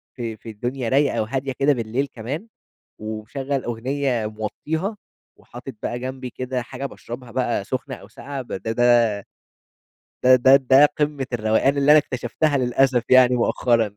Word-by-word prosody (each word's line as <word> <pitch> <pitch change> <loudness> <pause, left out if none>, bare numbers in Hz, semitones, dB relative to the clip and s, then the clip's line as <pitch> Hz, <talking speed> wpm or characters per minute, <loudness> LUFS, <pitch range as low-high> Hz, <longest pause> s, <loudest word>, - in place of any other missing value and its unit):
في 115 -3 -5
في 115 - -11
الدنيا 120 +3 -4
رايقة 140 0 +2
وهادية 135 +5 -2
كده 145 +1 +4
بالليل 120 +3 -2
كمان، 135 - -5 0.5
ومشغَّل 120 +6 -4
أغنية 125 0 -1
موطّيها 155 - -4 0.4
وحاطط 125 +2 -10
بقى 120 - -3
جنبي 130 0 -5
كده 130 +1 -4
حاجة 130 +3 -7
باشرَبها 120 -2 -8
بقى 120 -4 -1
سُخنة 130 +2 -4
أو - - -14
ساقعة 140 -1 -7
بده 110 -3 -5
ده 120 0 +4 1.2
ده 130 0 +7
ده 130 +2 +6
ده 135 +1 +6
قمّة 145 -2 0
الروقان 115 +5 +2
اللي 140 +1 +4
أنا 155 - +8
اكتشفتها 140 +3 -1
للأسف 125 -1 +2
يعني 125 -1 +6
مؤخرًا. 115 -3 +1
125 Hz, 145 wpm, -22 LUFS, 120-135 Hz, 1.2 s, أنا